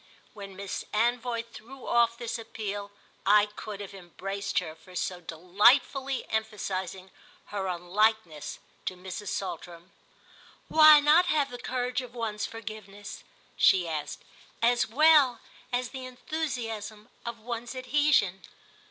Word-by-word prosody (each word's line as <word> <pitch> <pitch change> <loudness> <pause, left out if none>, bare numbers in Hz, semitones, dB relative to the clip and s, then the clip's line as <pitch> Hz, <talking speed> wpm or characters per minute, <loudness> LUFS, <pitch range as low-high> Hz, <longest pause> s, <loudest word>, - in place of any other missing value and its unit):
When 200 -2 -9
Miss 200 0 -5
Anvoy 235 +1 +1
threw 255 +4 -11
off 235 -1 +3
this 235 0 -4
appeal 205 -2 -5 0.3
I 205 +1 +6
could 210 0 -8
have 200 0 -8
embraced 195 +2 -5
her 160 -3 0
for 180 +3 -16
so 180 0 -2
delightfully 210 - +2
emphasising 190 -4 -3 0.4
her 195 -2 -2
unlikeness 180 -2 0 0.3
to 185 - -2
Mrs. 190 +3 -7
Saltram. 175 -2 -5 0.8
"Why 310 -1 +9
not 315 +5 +5
have 295 -5 +1
the 245 - -7
courage 250 +1 -2
of 250 -1 -11
one's 215 -2 -2
forgiveness," 215 -2 -9 0.3
she 180 -3 +4
asked, 155 -2 -4 0.4
"as 240 +1 +3
well 290 -1 +5 0.3
as 245 -1 -1
the 260 -1 -7
enthusiasm 240 -6 -4
of 235 0 -5
one's 235 +2 -5
adhesion?" 255 -8 +2
220 Hz, 125 wpm, -28 LUFS, 195-245 Hz, 0.8 s, Why